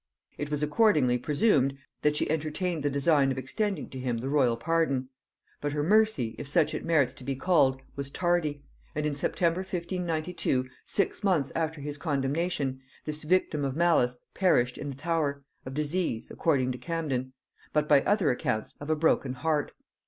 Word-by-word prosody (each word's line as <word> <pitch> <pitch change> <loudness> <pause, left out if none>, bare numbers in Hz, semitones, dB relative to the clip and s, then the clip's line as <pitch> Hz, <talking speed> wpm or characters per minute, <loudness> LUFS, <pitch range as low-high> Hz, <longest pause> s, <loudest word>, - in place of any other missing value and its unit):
It 145 - -4
was 150 0 -1
accordingly 150 - +3
presumed 140 - +2 0.2
that 150 0 +2
she - - 0
entertained 160 +2 -1
the 145 - +1
design 140 0 +3
of 130 - -3
extending 195 - -2
to 130 - -6
him 125 -2 -1
the 125 +4 -3
royal 130 -5 +3
pardon; 140 -2 0 0.5
but 145 0 -2
her 145 0 0
mercy, 205 - +3
if - - -6
such 150 +2 +2
it - - -3
merits 145 -6 +2
to 130 - -12
be 135 +1 -2
called, 135 -4 +2
was 140 -1 -5
tardy; 160 -3 0 0.3
and 150 0 -1
in 150 - 0
September 165 +4 0
1592, 175 -6 -2 0.2
six 200 - -1
months 170 -9 +2
after 160 -2 -2
his 145 0 -5
condemnation, 140 -2 -1 0.2
this 155 0 -3
victim 155 -2 +1
of 135 -1 -1
malice 160 -7 +3 0.2
perished 125 -10 +3
in 145 - -4
the 135 - -6
Tower, 145 -2 -1 0.2
of 130 - -6
disease, 150 -5 -1
according 130 -6 +1
to 125 - -6
Camden; 140 -7 -2 0.4
but, 150 0 +1
by 145 -2 +6
other 195 -6 +2
accounts, 110 -3 -2
of 145 - -7
a 155 - +3
broken 150 -4 +2
heart. 150 +3 0
150 Hz, 175 wpm, -28 LUFS, 135-165 Hz, 0.5 s, by